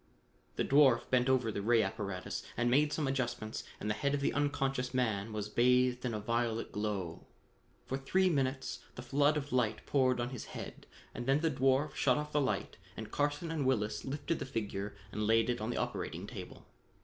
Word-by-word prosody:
The -, -, 0 dB
dwarf 135 Hz, -4 st, +5 dB
bent 125 Hz, 0 st, +3 dB
over 125 Hz, -4 st, +2 dB
the 100 Hz, -, -3 dB
ray 115 Hz, +1 st, +4 dB
apparatus 100 Hz, -3 st, -4 dB, 0.2 s
and 120 Hz, +1 st, +2 dB
made 150 Hz, +3 st, +4 dB
some 150 Hz, -2 st, -1 dB
adjustments 120 Hz, -5 st, -2 dB, 0.2 s
and -, -, -4 dB
the 105 Hz, -, +2 dB
head 140 Hz, +6 st, 0 dB
of -, -, -1 dB
the 140 Hz, -, 0 dB
unconscious 135 Hz, -3 st, 0 dB
man 110 Hz, -4 st, 0 dB
was 105 Hz, -1 st, -3 dB
bathed 125 Hz, +2 st, +3 dB
with 125 Hz, -2 st, -1 dB
a -, -, -2 dB
violet 115 Hz, +1 st, -1 dB
glow. 100 Hz, -5 st, -3 dB, 0.6 s
For 135 Hz, -, -3 dB
three 185 Hz, +8 st, +2 dB
minutes 135 Hz, -5 st, 0 dB, 0.2 s
the 120 Hz, -, -7 dB
flood 145 Hz, +4 st, +3 dB
of 145 Hz, -1 st, -4 dB
light 120 Hz, -4 st, +1 dB
poured 130 Hz, -3 st, +2 dB
on 120 Hz, +1 st, -2 dB
his 130 Hz, -, -6 dB
head -, -, -8 dB, 0.3 s
and 120 Hz, +1 st, -5 dB
then 135 Hz, +2 st, +3 dB
the 165 Hz, -1 st, +2 dB
dwarf 135 Hz, +2 st, +2 dB
shut 130 Hz, -3 st, +3 dB
off 150 Hz, 0 st, -3 dB
the 150 Hz, -, +2 dB
light 105 Hz, -8 st, -1 dB, 0.2 s
and 110 Hz, -1 st, -6 dB
Carson 145 Hz, +3 st, 0 dB
and 155 Hz, -3 st, -1 dB
Willis 110 Hz, -5 st, 0 dB
lifted 145 Hz, +4 st, -2 dB
the -, -, -3 dB
figure 105 Hz, -5 st, -3 dB, 0.2 s
and 105 Hz, 0 st, -2 dB
laid 115 Hz, +2 st, +4 dB
it 120 Hz, -, -3 dB
on 110 Hz, -, -2 dB
the 120 Hz, -, -2 dB
operating -, -, -3 dB
table. -, -, -9 dB
125 Hz, 200 wpm, -33 LUFS, 110-140 Hz, 0.6 s, dwarf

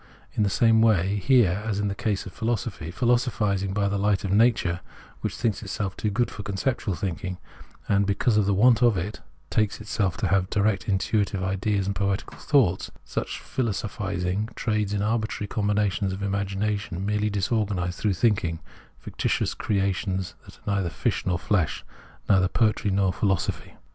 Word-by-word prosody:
In -, -, -1 dB
the 105 Hz, -, +3 dB
same 115 Hz, +2 st, +4 dB
way 105 Hz, -3 st, +3 dB
here 105 Hz, -3 st, +3 dB
in 105 Hz, +1 st, 0 dB
the 100 Hz, -, -1 dB
case 105 Hz, -2 st, -2 dB
of 95 Hz, -, -9 dB
philosophy; 110 Hz, -7 st, -2 dB
philosophising 105 Hz, -2 st, +1 dB
by 100 Hz, +1 st, +1 dB
the 100 Hz, 0 st, -1 dB
hght 100 Hz, -1 st, +1 dB
of 95 Hz, -, -2 dB
nature, 100 Hz, -5 st, +3 dB, 0.4 s
which -, -, -3 dB
thinks 110 Hz, -5 st, -1 dB
itself 100 Hz, -2 st, -3 dB
too 105 Hz, -, -1 dB
good 120 Hz, +4 st, 0 dB
for 105 Hz, -, -7 dB
conceptual 100 Hz, +1 st, -1 dB
thinking, 90 Hz, 0 st, -4 dB, 0.5 s
and, 100 Hz, -1 st, +2 dB
because 105 Hz, +3 st, +2 dB
of 105 Hz, -2 st, +3 dB
the 100 Hz, -, +3 dB
want 120 Hz, +4 st, +5 dB
of 120 Hz, -5 st, +4 dB
it, 90 Hz, -1 st, -4 dB, 0.3 s
takes 105 Hz, -2 st, +1 dB
itself 100 Hz, -4 st, -1 dB
to -, -, 0 dB
have 95 Hz, -1 st, +2 dB
direct 105 Hz, -1 st, +1 dB
intuitive 100 Hz, 0 st, 0 dB
ideas 95 Hz, +1 st, 0 dB
and 100 Hz, 0 st, -2 dB
poetical 100 Hz, +1 st, -2 dB
thoughts, 115 Hz, -, +2 dB
— -, -, -35 dB
such -, -, -2 dB
philosophising 100 Hz, -3 st, -2 dB
trades 105 Hz, -3 st, 0 dB
in 105 Hz, -1 st, 0 dB
arbitrary 110 Hz, -1 st, -1 dB
combinations 105 Hz, -1 st, 0 dB
of 95 Hz, +2 st, -5 dB
an -, -, 0 dB
imagination 100 Hz, -1 st, -2 dB
merely 105 Hz, +1 st, +1 dB
disorganised 100 Hz, -3 st, -1 dB
through 105 Hz, -3 st, +1 dB
thinking 85 Hz, -5 st, +1 dB, 0.3 s
— -, -, -28 dB
ficti -, -, -2 dB
tious -, -, 0 dB
creations 95 Hz, -2 st, -1 dB
that -, -, -14 dB
are -, -, -27 dB, 0.2 s
neither 90 Hz, -3 st, 0 dB
fish -, -, -1 dB
nor 90 Hz, -1 st, +2 dB
flesh, 90 Hz, -3 st, 0 dB, 0.4 s
neither 95 Hz, -2 st, +4 dB
poetry 110 Hz, 0 st, +1 dB
nor 95 Hz, -1 st, +2 dB
philosophy. 95 Hz, -4 st, -1 dB
100 Hz, 175 wpm, -25 LUFS, 95-105 Hz, 0.5 s, want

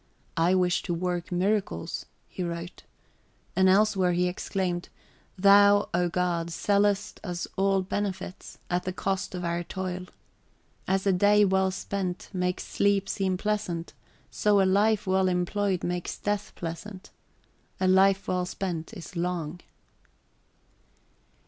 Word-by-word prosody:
"I 170 Hz, +3 st, +3 dB
wish 180 Hz, -1 st, +2 dB
to 175 Hz, -, +1 dB
work 175 Hz, 0 st, -2 dB
miracles," 185 Hz, -, -1 dB, 0.2 s
he -, -, -7 dB
wrote. 170 Hz, 0 st, -5 dB, 0.7 s
And 190 Hz, 0 st, +5 dB
elsewhere 190 Hz, -2 st, +3 dB
he 180 Hz, +1 st, +2 dB
exclaimed, 180 Hz, -1 st, -2 dB, 0.5 s
"Thou, 200 Hz, +1 st, +6 dB
O 175 Hz, 0 st, +2 dB
God, 170 Hz, -1 st, -1 dB
sellest 205 Hz, +3 st, +1 dB
us 175 Hz, -3 st, -3 dB
all 195 Hz, 0 st, +2 dB
benefits, 190 Hz, -1 st, -4 dB
at 180 Hz, 0 st, 0 dB
the 185 Hz, -, -2 dB
cost 195 Hz, 0 st, -2 dB
of 180 Hz, -1 st, -4 dB
our 170 Hz, 0 st, -1 dB
toil.... 185 Hz, 0 st, -5 dB, 0.8 s
As 190 Hz, +1 st, +1 dB
a 195 Hz, -, +4 dB
day 205 Hz, +3 st, +5 dB
well 190 Hz, 0 st, +2 dB
spent 185 Hz, -1 st, -4 dB
makes 180 Hz, -1 st, -1 dB
sleep 200 Hz, -1 st, +1 dB
{xiii} -, -, 0 dB
seem 190 Hz, -2 st, 0 dB
pleasant, 185 Hz, -5 st, -2 dB, 0.4 s
so 210 Hz, -1 st, +3 dB
a 195 Hz, -, +4 dB
life 210 Hz, +3 st, +3 dB
well 190 Hz, 0 st, +2 dB
employed 185 Hz, +1 st, 0 dB
makes 175 Hz, 0 st, -3 dB
death 205 Hz, 0 st, -2 dB
pleasant. 185 Hz, +4 st, -7 dB, 0.7 s
A 185 Hz, -, +2 dB
life 195 Hz, +1 st, +4 dB
well 180 Hz, -1 st, 0 dB
spent 180 Hz, +1 st, -4 dB
is 180 Hz, -1 st, -10 dB
long." 175 Hz, -1 st, -2 dB
185 Hz, 135 wpm, -27 LUFS, 180-200 Hz, 0.8 s, Thou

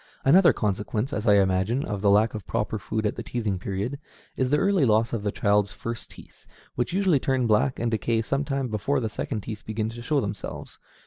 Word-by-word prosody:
Another 175 Hz, +7 st, +7 dB
consequence, 105 Hz, +5 st, -2 dB
as 105 Hz, +3 st, -2 dB
I 105 Hz, -, +6 dB
imagine, 95 Hz, +6 st, +2 dB
of 100 Hz, -2 st, -4 dB
the 100 Hz, -, +3 dB
lack 105 Hz, +2 st, +4 dB
of 110 Hz, -2 st, -7 dB
proper 105 Hz, +1 st, -2 dB
food 110 Hz, +3 st, -3 dB
at 105 Hz, -, -1 dB
the -, -, -3 dB
teething 105 Hz, -6 st, -2 dB
period, 100 Hz, +9 st, -3 dB, 0.4 s
is 130 Hz, -1 st, 0 dB
the 150 Hz, -, +3 dB
early 195 Hz, -3 st, +2 dB
loss 115 Hz, -1 st, +2 dB
of 115 Hz, -, -1 dB
the 105 Hz, 0 st, -1 dB
child's 100 Hz, 0 st, +1 dB
first 115 Hz, 0 st, -6 dB
teeth, -, -, -16 dB, 0.3 s
which 120 Hz, -1 st, -2 dB
usually 185 Hz, -5 st, +2 dB
turn 130 Hz, -1 st, 0 dB
black 115 Hz, +4 st, +2 dB
and 115 Hz, 0 st, -1 dB
decay 115 Hz, 0 st, 0 dB
some 135 Hz, +5 st, -1 dB
time 135 Hz, -2 st, -2 dB
before 110 Hz, +7 st, 0 dB
the 115 Hz, -3 st, -2 dB
second 105 Hz, +1 st, -4 dB
teeth 110 Hz, +1 st, -7 dB
begin 110 Hz, 0 st, -2 dB
to 120 Hz, +1 st, -8 dB
show 145 Hz, +4 st, +1 dB
themselves. 105 Hz, -4 st, -6 dB
110 Hz, 215 wpm, -25 LUFS, 105-130 Hz, 0.4 s, Another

